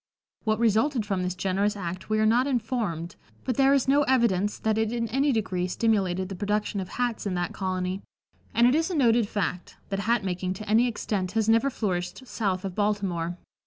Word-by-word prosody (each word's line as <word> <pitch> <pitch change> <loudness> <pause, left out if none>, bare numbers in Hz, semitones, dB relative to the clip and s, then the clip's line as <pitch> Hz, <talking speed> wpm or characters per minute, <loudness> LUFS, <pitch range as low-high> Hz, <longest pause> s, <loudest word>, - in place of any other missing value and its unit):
What 215 0 +2
resulted 230 +2 +2
from 195 -3 -1
this 180 0 -2
generous 200 +3 0
act 180 0 -5
we 215 - +2
are 215 - +3
not 240 +5 +3
informed, 220 - -2 0.3
but 255 - 0
there 270 +2 +4
is 275 -2 +3
no 280 +2 +4
evidence 220 -6 +2
that 220 0 0
it 220 0 0
in 235 -1 -1
any 275 +5 +2
degree 185 -6 -1
stimulated 190 -3 0
the 195 - -6
production 205 +2 -1
of 185 - -5
hats 245 -4 -2
in 185 - -2
that 175 -1 -2
colony, 185 0 -2 0.5
and 235 +2 +4
it 250 - +5
is 325 +3 +1
a 365 - -2
noted 235 -6 +3
fact 180 -3 -3
that 195 - -2
hat 230 +1 +1
making 185 0 -2
to 215 +3 -8
any 225 +4 +4
extent 200 -5 -2
has 220 -1 +1
never 230 +5 +4
flourished 190 0 -3
south 195 -5 -2
of 190 - -4
Baltimore. 185 -4 -1
210 Hz, 200 wpm, -26 LUFS, 185-235 Hz, 0.5 s, it